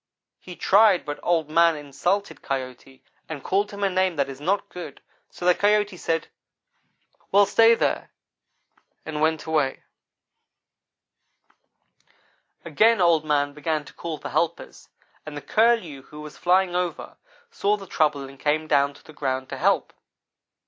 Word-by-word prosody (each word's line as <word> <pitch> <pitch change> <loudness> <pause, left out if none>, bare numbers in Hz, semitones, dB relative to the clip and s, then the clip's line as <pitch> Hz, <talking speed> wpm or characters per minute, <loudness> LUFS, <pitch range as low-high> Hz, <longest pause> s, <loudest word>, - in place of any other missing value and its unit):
He 180 - -11
tried 200 -1 +4
but 145 -1 -5
Old 165 -3 +1
man 165 +1 +4
insulted 155 +8 -2
Coyote. 130 0 -6 0.3
and 145 -4 -6
called 200 +2 0
him 200 -1 -6
a - - +4
name 185 -1 +1
that 140 -2 0
is 135 +1 -9
not 195 +6 0
good, 180 -1 -9 0.3
so 175 - -8
the 180 - +6
Coyote 205 0 +1
said, 165 -2 -2 1.0
'Well, 200 +1 +6
stay 225 +3 +5
there,' - - -1 1.0
and 150 -1 -4
went 160 0 +1
away. 150 -4 -1 2.8
"Again 215 +8 +3
Old 170 -3 +4
man 145 -2 0
began 150 0 -2
to - - -14
call 165 -2 -6
for - - -7
helpers, 170 0 -3 0.3
and 155 -1 -8
the - - -6
Curlew, 215 - +1
who 150 +3 -13
was 150 -1 -10
flying 180 0 +2
over, 180 -1 -3 0.3
saw 210 - 0
the 195 - -10
trouble, 150 -5 0
and 135 0 -14
came 155 +1 0
down 140 -2 +2
to - - -18
the 155 - -14
ground 130 -2 -3
to - - -5
help. - - +1
160 Hz, 150 wpm, -24 LUFS, 145-190 Hz, 2.8 s, the